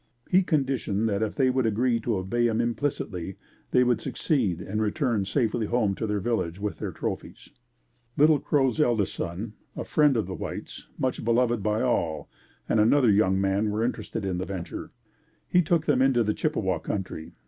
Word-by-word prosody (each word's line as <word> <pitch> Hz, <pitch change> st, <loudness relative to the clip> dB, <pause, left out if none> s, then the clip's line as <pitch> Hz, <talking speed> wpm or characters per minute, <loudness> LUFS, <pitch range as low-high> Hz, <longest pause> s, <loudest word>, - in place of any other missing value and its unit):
He 185 Hz, -, +6 dB
conditioned 135 Hz, -, 0 dB
that 100 Hz, 0 st, -1 dB
if 110 Hz, -2 st, -1 dB
they 130 Hz, -2 st, +3 dB
would 130 Hz, -2 st, +1 dB
agree 115 Hz, +2 st, +1 dB
to 115 Hz, -2 st, -1 dB
obey 120 Hz, +6 st, 0 dB
him 115 Hz, -1 st, 0 dB
implicitly, 115 Hz, -7 st, -2 dB, 0.3 s
they 125 Hz, -, +4 dB
would 125 Hz, -1 st, +1 dB
succeed 105 Hz, -, 0 dB
and 105 Hz, +4 st, -3 dB
return 110 Hz, -1 st, 0 dB
safely 115 Hz, -1 st, 0 dB
home 110 Hz, -4 st, +1 dB
to 110 Hz, -, -3 dB
their 105 Hz, -1 st, 0 dB
village 95 Hz, -5 st, -1 dB
with 100 Hz, -6 st, -3 dB
their -, -, -3 dB
trophies. -, -, -6 dB, 0.7 s
Little 150 Hz, 0 st, +5 dB
Crow's 135 Hz, 0 st, +1 dB
eldest 120 Hz, -9 st, +2 dB
son, 95 Hz, +5 st, -5 dB, 0.2 s
a -, -, -4 dB
friend 150 Hz, -4 st, +3 dB
of 110 Hz, -, 0 dB
the 95 Hz, -, -6 dB
whites, -, -, -7 dB
much 130 Hz, -1 st, -1 dB
beloved 120 Hz, 0 st, +2 dB
by 105 Hz, +3 st, 0 dB
all, 85 Hz, -11 st, -1 dB, 0.4 s
and 115 Hz, -, +2 dB
another 115 Hz, +2 st, +5 dB
young 95 Hz, -2 st, +3 dB
man 100 Hz, +2 st, +1 dB
were 105 Hz, +2 st, -1 dB
interested 115 Hz, -3 st, -3 dB
in 90 Hz, -2 st, -2 dB
the 95 Hz, -, -2 dB
venture. 95 Hz, -3 st, -6 dB, 0.6 s
He 180 Hz, -, +4 dB
took 165 Hz, -1 st, +1 dB
them 135 Hz, -4 st, +3 dB
into 130 Hz, -3 st, +4 dB
the 105 Hz, 0 st, 0 dB
Chippewa -, -, -1 dB
country. 90 Hz, -5 st, -5 dB
115 Hz, 180 wpm, -26 LUFS, 100-130 Hz, 0.7 s, He